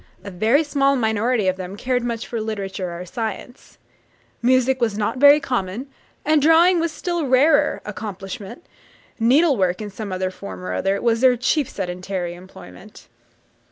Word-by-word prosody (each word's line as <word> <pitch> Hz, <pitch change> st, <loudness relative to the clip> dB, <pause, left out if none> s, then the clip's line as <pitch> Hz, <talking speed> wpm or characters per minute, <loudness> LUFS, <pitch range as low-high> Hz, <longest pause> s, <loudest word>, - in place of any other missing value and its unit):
A 200 Hz, -, -8 dB
very 225 Hz, -, +2 dB
small 275 Hz, -2 st, +1 dB
minority 220 Hz, -2 st, 0 dB
of 185 Hz, 0 st, +1 dB
them 185 Hz, +1 st, -7 dB
cared 250 Hz, +1 st, -1 dB
much 235 Hz, -1 st, -3 dB
for 230 Hz, -2 st, -4 dB
literature 195 Hz, -5 st, -4 dB
or 180 Hz, -, -7 dB
science. 225 Hz, +4 st, -7 dB, 0.6 s
Music 255 Hz, +1 st, +2 dB
was 220 Hz, -3 st, 0 dB
not 215 Hz, +4 st, -1 dB
a -, -, -6 dB
very 285 Hz, +2 st, +7 dB
common, 235 Hz, -3 st, -3 dB, 0.4 s
and 310 Hz, -1 st, +3 dB
drawing 335 Hz, +4 st, +5 dB
was 335 Hz, 0 st, -1 dB
a -, -, -14 dB
still 345 Hz, -5 st, -2 dB
rarer, 285 Hz, +4 st, +3 dB
accomplishment; 205 Hz, -, -7 dB, 0.5 s
needlework, 230 Hz, -, +3 dB
in 210 Hz, -1 st, -6 dB
some 205 Hz, 0 st, -7 dB, 0.2 s
form 95 Hz, -, -9 dB
or 90 Hz, 0 st, -4 dB
other, 195 Hz, -, 0 dB
was 230 Hz, -1 st, +1 dB
their 255 Hz, -1 st, +5 dB
chief 275 Hz, +3 st, 0 dB
sedentary 180 Hz, -1 st, -4 dB
employment. 175 Hz, -, -14 dB
225 Hz, 155 wpm, -21 LUFS, 190-265 Hz, 0.6 s, very